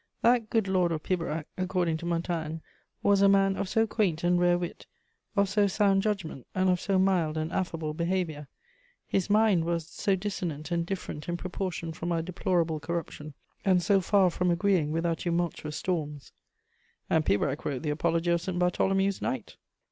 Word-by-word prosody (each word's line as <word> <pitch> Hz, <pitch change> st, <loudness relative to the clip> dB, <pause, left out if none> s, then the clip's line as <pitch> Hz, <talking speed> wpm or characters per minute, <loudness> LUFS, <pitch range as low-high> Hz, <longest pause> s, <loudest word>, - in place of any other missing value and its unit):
That 235 Hz, -2 st, +3 dB
"good 220 Hz, -4 st, +1 dB
Lord 185 Hz, -2 st, +2 dB
of 155 Hz, -2 st, -3 dB
Pibrac," 165 Hz, -4 st, -2 dB
according 180 Hz, -3 st, 0 dB
to 170 Hz, -, -6 dB
Montaigne, 165 Hz, -2 st, -2 dB, 0.4 s
was 200 Hz, -1 st, +4 dB
"a 200 Hz, -, +6 dB
man 195 Hz, 0 st, +4 dB
of 195 Hz, -1 st, -3 dB
so 225 Hz, +3 st, +3 dB
quaint 195 Hz, -7 st, 0 dB
and 175 Hz, 0 st, +3 dB
rare 175 Hz, 0 st, +4 dB
wit, 175 Hz, -1 st, -6 dB, 0.5 s
of 200 Hz, -1 st, +3 dB
so 205 Hz, +1 st, +2 dB
sound 195 Hz, 0 st, +3 dB
judgment, 195 Hz, -, -3 dB
and 185 Hz, 0 st, +3 dB
of 180 Hz, -, 0 dB
so 195 Hz, -1 st, +1 dB
mild 180 Hz, -5 st, +2 dB
and 155 Hz, +1 st, -2 dB
affable 165 Hz, -4 st, -2 dB
behaviour." 170 Hz, -3 st, -2 dB, 0.6 s
His 195 Hz, 0 st, -1 dB
mind 210 Hz, -5 st, +4 dB
was 170 Hz, -1 st, -1 dB
"so 195 Hz, +3 st, 0 dB
dissonant 180 Hz, -5 st, -4 dB
and 170 Hz, -1 st, 0 dB
different 175 Hz, -5 st, -5 dB
in 175 Hz, -, -1 dB
proportion 180 Hz, -2 st, -4 dB
from 170 Hz, +2 st, -4 dB
our 165 Hz, -1 st, 0 dB
deplorable 170 Hz, -2 st, 0 dB
corruption, 155 Hz, -2 st, -5 dB, 0.3 s
and 185 Hz, -3 st, +3 dB
so 200 Hz, 0 st, +3 dB
farre 190 Hz, -1 st, +3 dB
from 180 Hz, +1 st, 0 dB
agreeing 175 Hz, -3 st, +2 dB
with 165 Hz, +2 st, -1 dB
our 165 Hz, -1 st, +1 dB
tumultuous 170 Hz, -3 st, -2 dB
stormes." 150 Hz, -6 st, -3 dB, 0.8 s
And 160 Hz, -, +2 dB
Pibrac 135 Hz, +6 st, 0 dB
wrote 140 Hz, 0 st, -3 dB
the 150 Hz, -, 0 dB
apology 165 Hz, +2 st, +1 dB
of 170 Hz, 0 st, +2 dB
St. 185 Hz, -1 st, -3 dB
Bartholomew's 195 Hz, +2 st, +1 dB
Night! 130 Hz, -4 st, -4 dB
175 Hz, 180 wpm, -28 LUFS, 160-195 Hz, 0.8 s, a